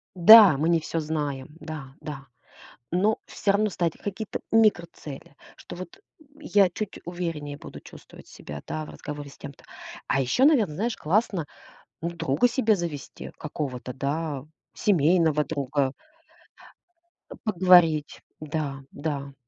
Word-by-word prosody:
Да, 200 -3 +9
мы 160 +4 +1
не 165 -1 +4
всё 165 +1 -3
знаем. 145 -4 -3
Да, 140 -4 -8
да. 140 -3 -8 0.6
Но 205 +5 +2
всё 200 - 0
равно 210 +1 +2
ставить 170 -3 -2
какие-то 205 +1 -5
микроцели, 170 -10 0 0.2
что - - -10
вот, 260 - -9 0.2
м, 310 - -22
я 205 -10 +3
чуть 210 +3 -6
увереннее 165 -5 -4
буду - - -10
чувствовать - - -15
себя, 75 0 -9
да, 155 0 -4
в - - -12
разговоре 145 -1 -8
с - - -16
тем-то. 140 -1 -11 0.4
А 135 - +1
ещё, 250 - +2
наверно, 230 - +3
знаешь, 225 +6 -2
классно, 185 -1 0 0.6
ну, 170 +1 -2
друга 165 - +1
себе 230 -3 +2
завести 165 -6 -6
какого-то, 130 -4 -5
да? 140 +1 -3 0.3
Семейного 160 -4 +3
друга. 140 -2 -1 1.4
А, - - -8
поговорить, 175 -7 +4 0.2
да, 150 -2 -3
да. 140 -2 -4
160 Hz, 135 wpm, -25 LUFS, 145-195 Hz, 1.4 s, Да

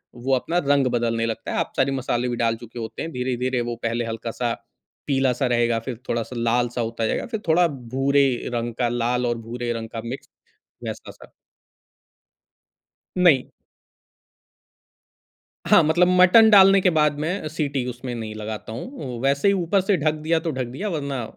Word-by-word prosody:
वो 125 +3 -1
अपना 165 +7 -1
रंग 140 -2 +3
बदलने 115 -1 0
लगता 115 -1 -4
है, - - -2
आप - - -2
सारी 135 +1 +2
मसाले 125 -2 -1
भी 120 - -2
डाल 115 -1 +1
चुके 120 +1 -10
होते 110 -1 -6
हैं। 165 - -4
धीरे-धीरे, 125 -1 -1
वो 120 0 -3
पहले 115 +1 -1
हल्का-सा 115 +1 -3 0.5
पीला-सा 135 -2 +1
रहेगा, 120 -1 +1
फिर 120 +1 -6
थोड़ा-सा 115 +2 -2
लाल-सा 120 +1 0
होता 115 0 -2
जाएगा, - - -1
फिर 220 - -1
थोड़ा 170 +2 +4
भूरे 135 0 +1 0.3
रंग 120 0 -2
का, 120 -1 0
लाल 120 +1 0
और 120 -1 0
भूरे 120 +1 -5
रंग 115 -1 -6
का 115 -1 -6
मिक्स, 125 +4 -7 0.5
वैसा-सा। - - -8 1.9
नहीं। 165 -8 +4 2.2
हाँ, - - +7
मतलब 175 +4 +3
मटन 220 +5 +7
डालने 195 -1 +7
के 185 - +3
बाद 150 -1 +2
मैं 160 +1 -2
सीटी 145 -4 -2
उसमें 125 0 -6
नहीं 110 -2 -6
लगाता 110 0 -6
हूँ, 125 - -7
वैसे 140 +7 +2
ही 200 - +4
ऊपर 190 +1 +1
से 190 +1 +1
ढक 155 -1 +1
दिया 165 +1 +2
तो 165 - -3
ढक 130 -2 -3
दिया 135 - -5
वरना, 140 -7 -3
125 Hz, 170 wpm, -23 LUFS, 120-150 Hz, 2.2 s, हाँ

